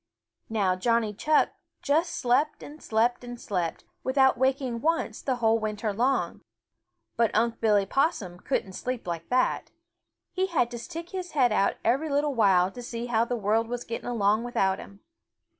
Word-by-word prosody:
Now 200 -5 +1
Johnny 230 +2 +1
Chuck 300 +9 +2 0.3
just 320 +5 +1
slept 265 +5 +1
and 300 +2 -11
slept 230 +3 +1
and 245 -1 -8
slept, 180 -7 -3 0.2
without 265 0 +4
waking 260 -2 0
once 330 +2 0
the 260 - 0
whole 225 -2 +2
winter 215 0 -2
long. 250 +6 0 0.8
But 230 -2 +3
Unc' 230 +2 +1
Billy 210 -3 +3
Possum 200 - 0
couldn't 195 -6 -2
sleep 250 +4 -4
like 170 -1 -5
that. 255 0 +1 0.6
He 375 0 0
had 250 -10 +1
to 240 - -5
stick 335 +6 -7
his 365 -2 -5
head 255 -5 +3
out 200 -2 +2
every 275 +7 +2
little 290 0 +1
while 195 -6 +4
to 245 - -9
see 235 0 -5
how 230 -1 +1
the 245 0 -2
world 220 +2 +1
was 245 +1 -4
getting 230 +1 -5
along 215 -1 +2
without 195 -6 0
him. 200 0 -12
235 Hz, 170 wpm, -27 LUFS, 210-265 Hz, 0.8 s, without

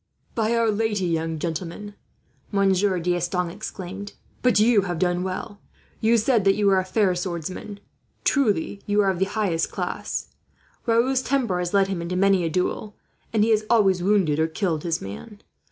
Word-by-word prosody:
"By 225 0 +1
our 230 -1 +3
Lady, 210 -2 0
young 165 -1 -1
gentleman," 170 +6 -5 0.6
Monsieur 195 -1 +2
D'Estanges 175 0 -1
exclaimed, 195 +2 -7 0.3
"but 250 -4 +3
you 220 -1 +5
have 175 -1 -2
done 175 +1 +1
well! 190 +2 -5 0.4
You 230 +1 +3
said 225 -1 +2
that 195 0 +4
you 210 - 0
were 195 -1 +5
a - - -1
fair 185 0 +1
swordsman. 180 +3 -5 0.4
Truly 205 - +1
you 205 0 +3
are 195 -1 +3
of 180 - -5
the 190 - +3
highest 195 -5 -1
class. - - -4 0.6
Raoul's 245 +3 +3
temper 250 -9 0
has 180 +2 -2
led 195 -1 +4
him 190 -3 -3
into 170 +2 -3
many 195 -1 +3
a 165 - 0
duel, 185 +5 -2 0.4
and 215 -2 +3
he 225 - +2
has 215 -1 +3
always 195 -6 +4
wounded 180 -6 +2
or 160 - +3
killed 165 -1 -1
his 165 0 -2
man. 205 - -9
195 Hz, 175 wpm, -24 LUFS, 175-210 Hz, 0.6 s, you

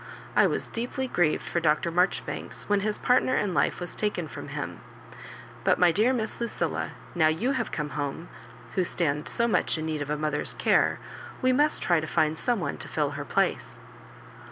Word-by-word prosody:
I - - +6
was - - -2
deeply 250 +3 -3
grieved 175 -9 +1
for 170 - 0
Dr. 160 +1 +2
Marjoribstfiks 180 +3 -1
when 205 -1 +2
his 210 +1 -1
partner 255 +1 +3
in 200 -3 0
life - - +1
was 175 -1 -5
taken 205 -6 -1
from - - -8
him; - - -5 0.8
but - - +4
my 180 -1 +5
dear 215 +8 +3
Miss 230 -2 -3
Lucilla, 235 - -2 0.2
now 160 -3 +4
you 165 +12 +1
have 255 -4 -1
come 150 -1 -2
home, 145 +4 -3 0.5
who 185 - +2
stand 150 -4 -1
so 235 - +1
much 180 -6 +1
in 155 - -3
need 155 -2 -2
of 145 - -4
a 150 - 0
mother's 150 -1 -2
care, - - +3 0.5
we 255 0 +4
must 295 +3 +2
try 175 -2 +3
to 155 - -4
find 155 -1 +1
some 245 -3 +1
one - - -3
to 135 - -8
fill 145 0 0
her 145 0 -4
place." - - 0
175 Hz, 195 wpm, -27 LUFS, 155-220 Hz, 0.8 s, I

